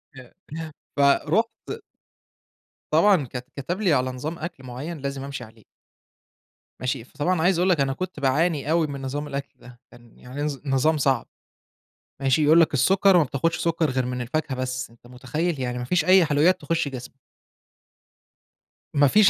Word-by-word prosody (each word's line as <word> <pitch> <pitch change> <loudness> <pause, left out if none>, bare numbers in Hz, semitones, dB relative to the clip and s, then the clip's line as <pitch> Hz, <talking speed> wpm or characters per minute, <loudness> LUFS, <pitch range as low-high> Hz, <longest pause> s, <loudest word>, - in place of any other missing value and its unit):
يا 130 -2 -13 0.2
ياه! 160 0 -6 0.3
فَرُحت 155 +10 +1 1.1
طبعًا 195 -8 +4
كت 125 -1 -5
كتب 175 +9 -3
لي 185 -7 +3
على 130 -2 +1
نظام 150 +7 -5
أكل 155 -4 -7
معيّن 130 +7 -6
لازم 140 -1 -4
امشي 140 -2 -6
عليه. 110 -1 -16 1.2
ماشي، 125 -2 -2
فطبعًا 160 +7 -1
عايز 175 +1 +3
اقول 180 +2 +2
لك، 175 -4 +3
أنا 135 -1 +1
كنت 185 +1 -5
باعاني 145 +2 +1
أوي 165 -1 +3
من 140 -2 -6
نظام 145 +3 -4
الأكل 140 -1 -4
ده، 120 -1 -15
كان 120 -1 -18
يعني 130 +4 -7
نظ 145 -1 -2
نظام 140 +3 +2
صعب، 135 -2 +1 0.9
ماشي، 135 +3 +2
يقول 160 +3 +6
لك 160 - +3
السكر 185 +7 +4
ما - - +5
بتاخدش 145 +5 -1
سكر 165 -3 0
غير 130 -1 -1
من 125 0 -3
الفاكهة 135 +3 -2
بس، 130 -1 -3
أنت 115 +1 -21
متخيل 135 +6 -3
يعني 125 -1 -2
ما 125 - -4
فيش 170 +5 +1
أي 185 +1 +6
حلويات 155 +4 +3
تخش 150 0 -1
جسمك! 130 0 -9 1.7
ما 145 0 +5
فيش 210 +7 +6
145 Hz, 170 wpm, -24 LUFS, 130-165 Hz, 1.7 s, يقول